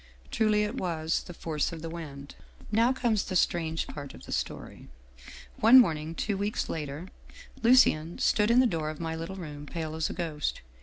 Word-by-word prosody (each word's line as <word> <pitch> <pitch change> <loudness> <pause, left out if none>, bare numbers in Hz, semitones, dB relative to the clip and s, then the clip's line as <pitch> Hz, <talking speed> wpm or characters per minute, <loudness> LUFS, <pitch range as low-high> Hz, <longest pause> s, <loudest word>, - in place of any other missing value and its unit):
Truly 215 -1 +2
it 210 +5 -3
was 165 -3 -1
' - - -21
The - - -7
Force 155 -1 -2
of 165 -1 -8
the - - -3
Wind/ 145 -4 -8 0.2
" - - -18
Now 240 +2 +4
comes 235 -6 +1
the 185 - -4
strange 165 -2 +1
part 140 -2 -8
of - - -14
the - - -10
story. - - -4 0.7
One 230 +4 +8
morn 165 -10 +3
ing, 155 +2 -6
two 200 +2 -1
weeks 205 +4 -2
later, 150 +3 -5 0.5
Lucien 225 -10 +4
stood 210 0 +2
in 235 +2 +5
the - - +4
door 160 -8 -1
of 155 - -7
my 165 -1 -3
little 165 +4 -6
room, 150 -5 -8
pale 160 -1 -4
as 160 0 -1
a - - -4
ghost. 160 -4 -3
165 Hz, 205 wpm, -28 LUFS, 155-210 Hz, 0.7 s, One